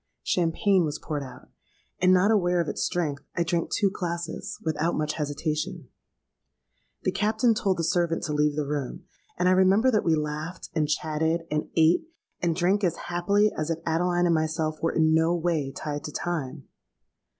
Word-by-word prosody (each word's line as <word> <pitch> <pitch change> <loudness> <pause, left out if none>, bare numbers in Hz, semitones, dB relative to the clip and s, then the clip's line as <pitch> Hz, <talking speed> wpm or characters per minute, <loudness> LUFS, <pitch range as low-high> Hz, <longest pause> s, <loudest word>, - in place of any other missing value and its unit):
Champagne 185 +2 +2
was 150 -1 -2
poured 150 -2 -4
out; 130 -2 -11 0.5
and, 185 0 +4
not 185 +3 +5
aware 180 -4 +2
of 170 - 0
its - - -3
strength, 155 -6 -1 0.2
I 170 - +3
drank 170 0 -1
two 200 -3 +2
glasses 170 -3 -4
without 160 +1 0
much 155 0 -1
hesitation. 150 +1 -3 1.1
The - - +1
Captain 225 +3 +2
told 195 -3 0
the 165 - -1
servant 170 0 +1
to 150 - -2
leave 150 0 +2
the 150 -1 -1
room; 145 -2 -4 0.3
and 180 - +2
I - - +5
remember 190 +7 +4
that 215 - +2
we 165 -2 +3
laughed, 150 +2 -4
and 155 -3 0
chatted, 160 +2 0
and 150 0 -1
ate, 165 - +4 0.3
and 170 -2 +1
drank 190 +4 +1
as 175 -4 +2
happily 200 +4 +2
as 155 +1 -2
if 165 - 0
Adeline 175 +2 +1
and 170 - +3
myself 155 -1 -1
were 165 - +1
in 160 -1 +3
no 160 +2 +3
way 160 -5 -1
tied 145 +1 -5
to 150 - -5
time. 150 -4 -4
165 Hz, 180 wpm, -26 LUFS, 155-180 Hz, 1.1 s, not